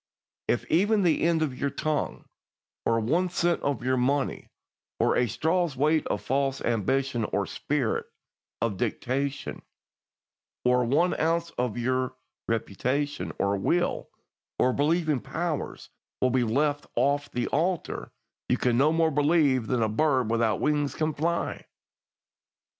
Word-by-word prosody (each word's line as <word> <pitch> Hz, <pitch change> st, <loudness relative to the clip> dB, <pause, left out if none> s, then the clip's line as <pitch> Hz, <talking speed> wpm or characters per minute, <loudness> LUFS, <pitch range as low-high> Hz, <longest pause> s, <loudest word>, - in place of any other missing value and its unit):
If 120 Hz, -, 0 dB
even 205 Hz, +5 st, +3 dB
the 165 Hz, -4 st, +2 dB
end 165 Hz, -1 st, +2 dB
of 140 Hz, -5 st, -2 dB
your 140 Hz, -, 0 dB
tongue, 155 Hz, +1 st, -2 dB, 0.6 s
or 115 Hz, 0 st, +3 dB
one 165 Hz, +12 st, +1 dB
cent 175 Hz, 0 st, +1 dB
of 140 Hz, -4 st, -1 dB
your 130 Hz, +1 st, +1 dB
money, 135 Hz, +3 st, 0 dB, 0.5 s
or -, -, +2 dB
a 125 Hz, -, +2 dB
straw's 160 Hz, -, 0 dB
weight 155 Hz, +3 st, +2 dB
of -, -, -2 dB
false 135 Hz, 0 st, 0 dB
ambition, 120 Hz, +2 st, 0 dB
or 100 Hz, -1 st, -1 dB
spirit 140 Hz, -1 st, -1 dB, 0.6 s
of 110 Hz, -4 st, -1 dB
dictation, 135 Hz, +7 st, -2 dB, 1.0 s
or 125 Hz, 0 st, +4 dB
one 155 Hz, +9 st, +2 dB
ounce 165 Hz, +1 st, +1 dB
of 125 Hz, -2 st, -2 dB
your 130 Hz, +1 st, 0 dB, 0.3 s
reputation, 130 Hz, +6 st, -1 dB
or 100 Hz, 0 st, +1 dB
will, 175 Hz, -, 0 dB, 0.5 s
or 125 Hz, -, +3 dB
believing 155 Hz, 0 st, +1 dB
powers 165 Hz, +3 st, -4 dB, 0.3 s
be 130 Hz, -1 st, +2 dB
left 145 Hz, +5 st, 0 dB
off 140 Hz, +4 st, +1 dB
the 120 Hz, -, -2 dB
altar, 175 Hz, +3 st, -1 dB, 0.4 s
you 125 Hz, -, +3 dB
can 120 Hz, -1 st, +1 dB
no 150 Hz, +3 st, +4 dB
more 160 Hz, 0 st, +2 dB
believe 145 Hz, -5 st, +3 dB
than 125 Hz, -3 st, +1 dB
a -, -, +2 dB
bird 130 Hz, 0 st, +1 dB
without 115 Hz, -3 st, +1 dB
wings 145 Hz, -1 st, 0 dB
can 155 Hz, 0 st, 0 dB
fly. 170 Hz, +4 st, -2 dB
140 Hz, 135 wpm, -27 LUFS, 125-155 Hz, 1.0 s, or